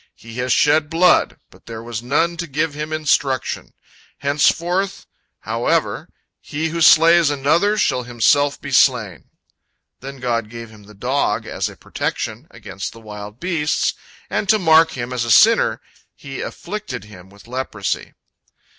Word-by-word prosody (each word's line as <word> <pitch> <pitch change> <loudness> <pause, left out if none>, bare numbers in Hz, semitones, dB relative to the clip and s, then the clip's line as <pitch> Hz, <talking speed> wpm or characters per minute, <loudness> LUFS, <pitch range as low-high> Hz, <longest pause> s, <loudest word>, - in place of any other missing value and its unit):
He 115 0 -13
has 125 0 -1
shed 150 0 +3
blood, 175 +2 +3
but - - -21
there 115 -1 -7
was 115 -1 -5
none 155 +8 0
to 170 0 -4
give 155 +1 -1
him 150 +1 -5
instruction. 140 -4 -1 0.5
Henceforth, 170 +7 0 0.4
however, - - -1 0.3
he 160 +2 -3
who 165 +1 -4
slays 165 0 +6
another 160 +9 +1
shall 125 - +1
himself 125 +4 +2
be 145 - -8
slain." 115 - +2 0.7
Then 135 +1 -9
God 115 -3 -2
gave 115 -1 -9
him 105 -2 -16
the 105 +1 -16
dog 120 -1 -1
as - - -3
a - - -14
protection 115 +7 -4
against 100 -4 -8
the 115 - -13
wild 105 0 -10
beasts, 165 -4 0 0.3
and 205 - -2
to 220 - +5
mark 160 -3 +4
him 125 0 -5
as 125 -1 -1
a 120 - -4
sinner, - - +5 0.4
He 135 -1 -8
afflicted 210 - -6
him 95 -3 -14
with 100 +2 -18
leprosy. 120 -5 -4
135 Hz, 150 wpm, -20 LUFS, 115-160 Hz, 0.7 s, slays